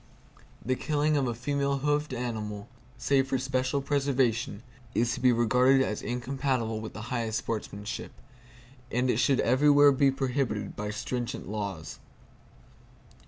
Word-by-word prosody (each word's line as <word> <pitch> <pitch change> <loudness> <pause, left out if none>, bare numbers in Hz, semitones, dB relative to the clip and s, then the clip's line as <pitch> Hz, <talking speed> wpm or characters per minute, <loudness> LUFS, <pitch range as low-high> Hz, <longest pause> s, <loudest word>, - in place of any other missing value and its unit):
The 130 - +1
killing 150 +3 +1
of 140 -3 +1
a 120 - -2
female 140 +2 0
hoofed 150 +1 0
animal, 110 -5 -4 0.3
save 135 0 +2
for 135 - 0
special 130 +1 -1
preservation, 130 -6 0 0.3
is 120 +1 +2
to 130 - -4
be 125 0 +5
regarded 125 +3 +4
as 105 - -3
incompatible 125 -2 -2
with 110 - -7
the 110 +3 -6
highest 115 -2 -1
sportsmanship; 105 -2 -5 0.8
and 125 +2 +2
it - - 0
should 125 +2 +3
everywhere 145 +3 +5
be 140 0 +4
prohibited 130 -6 -2
by 105 0 -4
stringent 120 +3 -4
laws. 100 -6 -5
125 Hz, 135 wpm, -28 LUFS, 115-135 Hz, 0.8 s, be